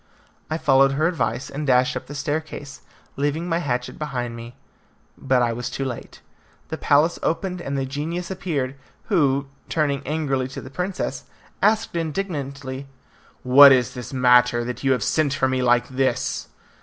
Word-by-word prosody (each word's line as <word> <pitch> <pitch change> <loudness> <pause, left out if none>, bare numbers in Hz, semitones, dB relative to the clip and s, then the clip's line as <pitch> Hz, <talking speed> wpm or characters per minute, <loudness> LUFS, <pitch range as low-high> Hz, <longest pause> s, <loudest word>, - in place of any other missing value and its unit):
I 155 - -1
followed 135 -3 +4
her 155 +4 +2
advice 130 -7 -1
and 145 +2 -4
dashed 125 -1 +3
up - - -5
the 145 - -8
staircase, 145 -1 -4 0.4
leaving 145 +4 -1
my 165 -1 0
hatchet 125 -6 -3
behind 125 -6 -3
me. 115 +1 -9 0.6
But 130 -2 +1
I 120 -1 +1
was 120 +1 -4
too 135 - -3
late. 125 -3 -7 0.5
The - - -4
palace 150 +4 +3
opened 180 +2 -2
and 140 -3 -3
the 135 - -1
genius 160 +7 -4
appeared, 150 -9 -2 0.4
who, 140 -8 +2 0.2
turning 145 -4 0
angrily 140 -4 -1
to 130 - -8
the 130 - -11
princess, 180 +5 -3 0.4
asked 215 -2 +2
indignantly, 140 -6 -4 0.6
"What 140 +2 +9
is 125 -3 +3
the 125 +1 -7
matter, 125 -1 +4
that 125 +2 -5
you 135 -1 +4
have 125 -5 -1
sent 145 +1 +1
for 135 - +2
me 130 0 0
like 120 -1 +3
this?" 130 0 -1
140 Hz, 165 wpm, -23 LUFS, 130-155 Hz, 0.6 s, What